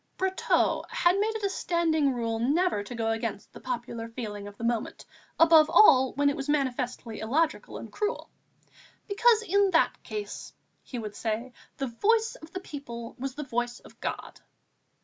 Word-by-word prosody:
Brotteaux 380 0 +1
had 355 +3 +2
made 440 +2 0
it 440 - -4
a 400 - +2
standing 320 -6 +1
rule 230 -2 -2
never 300 - +2
to 240 +4 -8
go 225 -1 0
against 225 -2 -4
the - - -10
popular 235 -2 -5
feeling 210 -4 -6
of 205 0 -11
the - - -8
moment, 235 -1 -2 0.3
above 320 -2 +7
all 265 -10 +6
when 285 +1 +2
it 285 - +2
was 275 +1 -5
manifestly 255 -5 -1
illogical 300 +9 0
and - - -9
cruel, 425 +2 -3 0.8
"because 450 +2 +4
in 400 -1 +3
that 325 - +2
case," 420 -1 -6 0.3
he 250 - -8
would 215 -3 -6
say, 230 +3 -3 0.2
"the 270 - -1
voice 440 - +1
of 315 - -13
the 375 - -5
people 235 -8 -8
was 270 0 -4
the 300 - -4
voice 240 -2 -2
of - - -17
God." - - -5
270 Hz, 170 wpm, -28 LUFS, 235-345 Hz, 0.8 s, above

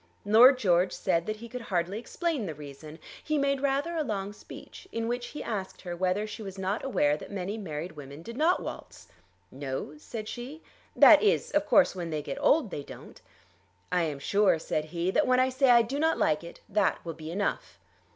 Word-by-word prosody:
Lord 240 +6 +7
George 185 -5 +2
said 170 -3 0
that 215 - -2
he 230 +2 -10
could 250 +1 -7
hardly 185 -1 -2
explain 295 - -2
the 160 - -5
reason. 150 +2 -10 0.3
He 305 -1 0
made 275 -1 +1
rather 280 +4 0
a 320 - 0
long 205 -5 -3
speech, 295 - -12
in 230 0 -2
which 240 +1 -2
he 300 - -7
asked 200 -5 -5
her 175 -2 -5
whether 185 +4 0
she 215 +1 -8
was 195 -2 -7
not 190 +3 -2
aware 150 - +2
that - - -9
many 195 +1 -4
married 170 -5 -5
women 145 0 -10
did 230 +4 -8
not 320 +6 +2
waltz. - - -9 0.4
"No," 135 +1 -5
said 215 +6 -7
she. 260 +8 -7 0.3
"That - - +8
is, 430 +1 +2
of 300 0 +1
course, 290 -9 +4
when 175 -2 -4
they 155 -2 -3
get 275 - -5
old 290 - +3
they 145 - -4
don't." - - -12 0.7
"I 180 - +2
am 155 -4 -2
sure," 200 +5 +2
said 155 -1 -2
he, 170 +3 -2
"that - - +2
when 255 0 +4
I 255 0 +3
say 260 +1 +2
I 235 -1 +7
do 265 +5 -4
not 320 +1 +2
like 155 +1 +1
it, 170 - -11
that 205 -1 +1
will 165 - -4
be 160 0 -9
enough." 200 +5 -3
205 Hz, 210 wpm, -28 LUFS, 170-255 Hz, 0.7 s, That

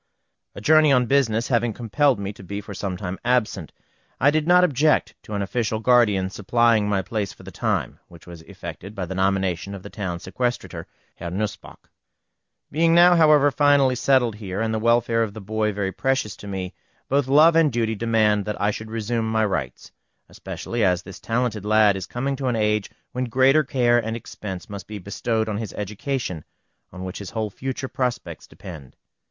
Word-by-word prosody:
A - - -8
journey 155 +4 +5
on 125 -2 +4
business 120 -3 +1
having 120 -2 +1
compelled 125 +5 +1
me 100 +1 -4
to 100 - -13
be 100 +2 -5
for 105 0 -9
some 95 -1 -4
time 95 0 -5
absent, 115 -9 0 0.5
I 140 +3 +5
did 155 +1 0
not 180 +1 +6
object 150 -2 +2
to 105 - -7
an 100 - -1
official 110 +2 -1
guardian 110 -6 +3
supplying 110 +1 +2
my 95 -2 0
place 105 -1 -3
for - - -16
the - - -10
time, - - -2
which 85 -2 -16
was 85 -2 -11
effected 90 +2 -9
by 95 -3 -3
the 90 - -6
nomination 95 0 0
of 95 - -10
the 100 - -10
Town 95 -5 -4
Sequestrator, 120 +8 -3 0.3
Herr 85 - -5
Nussböck. 100 +4 -5 0.8
Being 165 +2 +3
now, 175 +1 +7
however, 150 -3 +5
finally 140 -2 +4
settled 125 -2 +2
here, 95 -2 -5
and 110 0 -1
the 110 - 0
welfare 115 0 +2
of 110 -2 -2
the - - -6
boy 110 +1 -1
very 100 -1 -2
precious 135 -2 -1
to 100 - -10
me, 95 -2 -5 0.3
both 140 -1 +1
love 155 +5 +6
and 165 -3 +4
duty 115 -2 0
demand 110 -2 +1
that 105 - -4
I 105 +1 +2
should 110 +1 -7
resume 115 0 -2
my 110 -1 +2
rights; 75 - -4 0.4
especially 120 -2 -4
as 90 -2 +2
this 95 -1 -10
talented 115 -3 -1
lad 105 -1 +4
is 95 -3 -5
coming 135 +3 -2
to 135 -1 -3
an 125 - +1
age 105 -1 0 0.2
when 125 +1 -2
greater 130 +5 +4
care 120 -3 +2
and 110 +1 -3
expense 95 -5 -8
must 100 -3 -8
be 105 - -6
bestowed 110 +3 -2
on 105 -1 -2
his 110 -3 -5
education, 105 - -4 0.5
on 90 +1 -8
which 95 0 -6
his 100 - -7
whole 110 -2 -3
future 130 +4 -4
prospects 125 -2 -4
depend. 75 -8 -11
110 Hz, 190 wpm, -23 LUFS, 100-125 Hz, 0.8 s, now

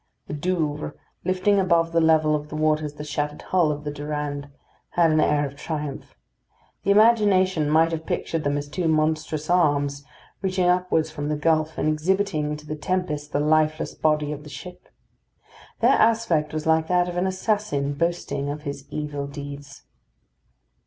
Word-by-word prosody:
The - - -7
Douvres, 150 -2 -2 0.3
lifting 185 +2 +2
above 170 -3 +2
the 165 0 +3
level 155 -1 +4
of 150 0 -4
the 155 - -6
waters 155 -1 +1
the 150 - -7
shattered 150 0 -3
hull 175 -5 +2
of 150 0 -5
the 145 - -3
Durande, 145 -1 -4 0.5
had 170 -2 +4
an 155 0 +3
air 150 -1 +2
of 140 0 -7
triumph. 150 -1 -5 0.7
The - - -3
imagination 200 -7 +4
might 160 +2 +4
have 160 -1 -4
pictured 165 -2 -2
them 145 0 0
as 145 0 -4
two 165 +4 -2
monstrous 155 -1 0
arms, 145 -5 +2 0.4
reaching 185 -2 +1
upwards 180 -3 +1
from 145 -1 -4
the 150 - 0
gulf, 155 +1 +1
and - - 0
exhibiting 155 -1 0
to 150 - -14
the 155 - -4
tempest 150 -3 -2
the - - 0
lifeless 155 +1 +1
body 150 -1 +1
of 150 0 -6
the 150 - -11
ship. 180 +6 -10 0.9
Their - - +5
aspect 220 -10 +2
was 155 0 -4
like 160 0 +3
that 180 0 +2
of 175 - -5
an 180 +2 +1
assassin 185 -7 -1
boasting 170 -3 -2
of 150 +1 -5
his 140 -1 -6
evil 145 -2 -4
deeds. 140 0 -9
155 Hz, 170 wpm, -24 LUFS, 150-175 Hz, 0.9 s, Their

